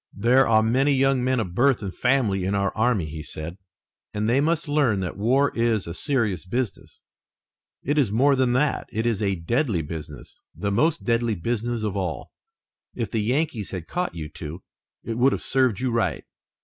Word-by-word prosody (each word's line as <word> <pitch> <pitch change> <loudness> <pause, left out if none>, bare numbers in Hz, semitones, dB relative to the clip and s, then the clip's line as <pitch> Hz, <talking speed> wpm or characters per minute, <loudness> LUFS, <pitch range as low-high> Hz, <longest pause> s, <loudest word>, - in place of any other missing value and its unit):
"There 125 +6 +4
are 110 -1 +4
many 130 +6 +2
young 135 -1 +2
men 130 0 +1
of 90 -6 -3
birth 120 +2 +2
and 95 -2 -4
family 120 -7 +1
in 95 +2 0
our 100 -1 0
army," 110 -5 +1
he 75 0 -7
said, 80 +4 -7 0.6
"and 105 +1 0
they 125 +4 +3
must 165 +1 0
learn 145 -9 +2
that 90 - -4
war 130 +8 +2
is 115 -3 +1
a 85 - -6
serious 115 - -1
business. 115 +3 -4 0.8
It 145 +3 +1
is 125 -8 +2
more 135 +6 +4
than 130 -2 +2
that; 145 +4 0
it 110 +1 -2
is 115 -3 0
a 100 -2 +1
deadly 95 - 0
business, 75 -2 -9 0.2
the 100 - -2
most 155 +10 +1
deadly 115 -2 +1
business 115 +4 -2
of 105 -2 -2
all. 90 -5 -3 0.6
If 115 -4 -3
the 110 - 0
Yankees 120 - -1
had 90 -4 -6
caught 180 - -3
you 80 -3 -5
two, 80 +3 -8 0.4
it 115 0 -4
would 135 +2 +4
have - - -3
served 130 -6 +2
you 130 -1 -1
right." 115 -1 0
115 Hz, 190 wpm, -24 LUFS, 95-130 Hz, 0.8 s, There